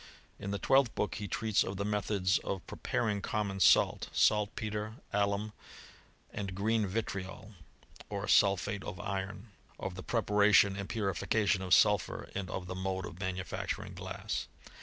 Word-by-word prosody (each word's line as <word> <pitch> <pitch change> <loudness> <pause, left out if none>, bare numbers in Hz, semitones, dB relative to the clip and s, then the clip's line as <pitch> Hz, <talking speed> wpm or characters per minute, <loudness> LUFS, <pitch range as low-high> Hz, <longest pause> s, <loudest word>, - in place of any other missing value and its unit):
In 100 - -5
the 100 - -1
twelfth 135 +2 +3
book 105 - -1
he 100 - -3
treats 110 +3 +1
of 95 - -5
the 100 - -2
methods 105 -2 +1
of 95 -3 -4
pre - - -9
paring 105 -2 0
common 100 -1 -2
salt, - - +4
saltpetre, 105 0 +1 0.2
alum, 100 +1 0 0.8
and 95 -2 -4
green 110 +2 +1
vitriol, 95 0 -4 0.6
or 100 0 -3
sulphate 100 0 +3
of 90 - -6
iron; 100 +1 -4 0.3
of 95 - -4
the 95 - -7
preparation 105 -2 +4
and 100 0 -5
purification 100 -1 +1
of 95 -1 +5
sulphur, 105 -1 +2
and 95 -2 -4
of 90 - -4
the 90 - -5
mode 95 0 -2
of 85 +1 -9
manufacturing 95 -1 -4
glass. - - -4
100 Hz, 150 wpm, -32 LUFS, 95-105 Hz, 0.8 s, of